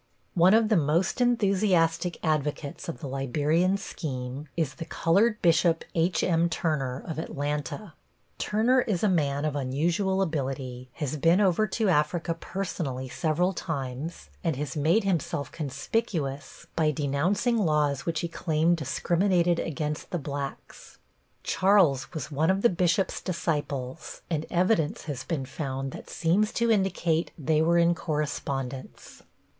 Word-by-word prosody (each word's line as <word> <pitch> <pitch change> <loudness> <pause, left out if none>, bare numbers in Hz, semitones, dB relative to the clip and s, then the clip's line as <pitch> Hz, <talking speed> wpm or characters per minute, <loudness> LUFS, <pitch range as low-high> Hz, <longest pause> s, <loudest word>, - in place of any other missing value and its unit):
One 180 +4 +6
of 225 -1 +3
the 215 - +4
most 165 - +1
enthusiastic 190 -7 +2
advocates 150 -1 -2
of 165 - -6
the 145 - -4
Liberian 150 +8 +1
scheme 135 -6 -5
is 155 -5 0
the 165 - -7
colored 210 +8 +2
Bishop 165 0 +3
H.M. 170 0 +2
Turner, 140 -6 -1
of 160 -2 -4
Atlanta. 150 +5 -4 0.5
Turner 235 +5 +3
is 210 -7 -1
a - - +5
man 145 -6 +1
of 150 -2 -1
unusual 170 +9 +1
ability, 130 -6 -4
has 150 -1 -3
been 165 +5 +4
over 205 +1 +3
to 215 +2 0
Africa 165 0 +1
personally 165 -8 -4
several 170 +7 0
times, 140 -1 -5
and 165 -5 0
has 140 -1 -4
made 160 +9 +3
himself 165 -6 -1
conspicuous 150 - -3
by 155 -2 +3
denouncing 160 - +1
laws 150 -6 +1
which 165 -2 -1
he 170 - -1
claimed 165 0 +1
discriminated 175 +4 +1
against 150 -1 -3
the 180 - -1
blacks. 140 -2 -7 0.5
Charles 185 -9 +3
was 155 -2 -5
one 155 +3 +1
of 190 +1 +1
the 235 - +7
bishop's 180 +2 +1
disciples 145 -6 -3
and 160 -1 -1
evidence 175 -3 +1
has 140 -5 -5
been 150 -6 -3
found 135 -1 -4
that - - -10
seems 190 +6 +1
to 235 0 +2
indicate 175 -5 +1
they 155 0 +1
were 170 +2 +3
in 170 0 +4
correspondence. 140 -5 -4
165 Hz, 140 wpm, -27 LUFS, 145-185 Hz, 0.5 s, the